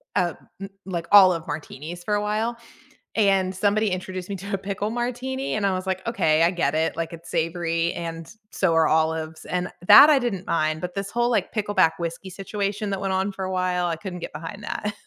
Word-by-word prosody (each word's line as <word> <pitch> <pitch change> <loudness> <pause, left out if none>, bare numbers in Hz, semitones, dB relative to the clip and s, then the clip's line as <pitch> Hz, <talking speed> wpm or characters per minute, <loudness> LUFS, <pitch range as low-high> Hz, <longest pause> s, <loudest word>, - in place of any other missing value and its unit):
uh, 175 -2 +1 0.3
m 195 - -6 0.2
like, 170 -3 -4
olive 185 -5 +6
martinis 155 +3 -7
for 210 - -2
a 205 - +2
while, 215 +3 -1 0.6
and 195 -3 +2
somebody 205 +2 +2
introduced 185 0 -5
me 200 - -3
to 200 +2 -7
a - - +2
pickle 200 +2 -3
martini, 250 +3 -3
and 210 - 0
I 195 - +2
was 185 +1 -4
like, 190 0 -2
"Okay. 160 -9 +2
I 170 - +4
get 170 -5 0
it; 160 +1 0
like, 165 -1 -3
it's 170 0 -10
savory 165 0 0
and 165 -1 -6 0.2
so 175 -4 +1
are 160 -1 +4
olives," 160 0 0
and 180 0 -2 0.2
that 295 - +10
I 285 - +5
didn't 205 -7 -3
mind, 155 -1 0
but 180 0 -4
this 195 0 -3
whole, 240 +1 +1
like, 230 - 0
pickleback 205 -6 +2
whiskey 170 +3 -5
situation 200 +2 -3
that 195 0 -3
went 195 -1 -1
on 190 +2 0
for 190 -1 -5
a 185 - -4
while, 180 -1 0
I 170 - -1
couldn't 180 +1 -7
get - - -7
behind 185 +6 -8
that 210 0 -3
185 Hz, 215 wpm, -24 LUFS, 165-205 Hz, 0.6 s, that